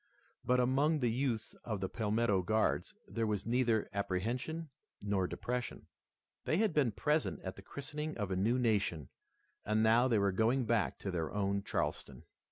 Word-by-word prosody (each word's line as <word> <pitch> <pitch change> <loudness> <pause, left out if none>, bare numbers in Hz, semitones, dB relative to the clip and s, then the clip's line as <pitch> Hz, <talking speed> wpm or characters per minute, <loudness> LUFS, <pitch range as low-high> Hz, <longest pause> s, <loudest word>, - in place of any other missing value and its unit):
But 125 0 +3
among 135 +5 +3
the 120 -2 +2
youths 120 -2 -1
of 110 -4 -3
the 95 - -1
Palmetto 105 -1 +1
Guards 110 +4 0
there 115 -1 -1
was 105 -2 -1
neither 115 -2 +2
apprehension 120 - -2 0.3
nor 100 -2 0
depression. 125 +4 -4 0.6
They 155 - +2
had 215 -3 +2
been 140 -6 +3
present 150 - 0
at 95 - -5
the - - -11
christening 150 +7 -5
of 105 -4 -2
the 95 - -1
new 110 +7 +2
nation, 100 - 0 0.5
and 110 +1 +1
now 115 +3 +5
they 115 -4 +3
were 100 -1 +3
going 115 +6 +2
back 115 -2 +1
to 95 - -3
their 85 -3 -2
own 100 -1 0
Charleston. - - -3
110 Hz, 170 wpm, -34 LUFS, 100-125 Hz, 0.6 s, now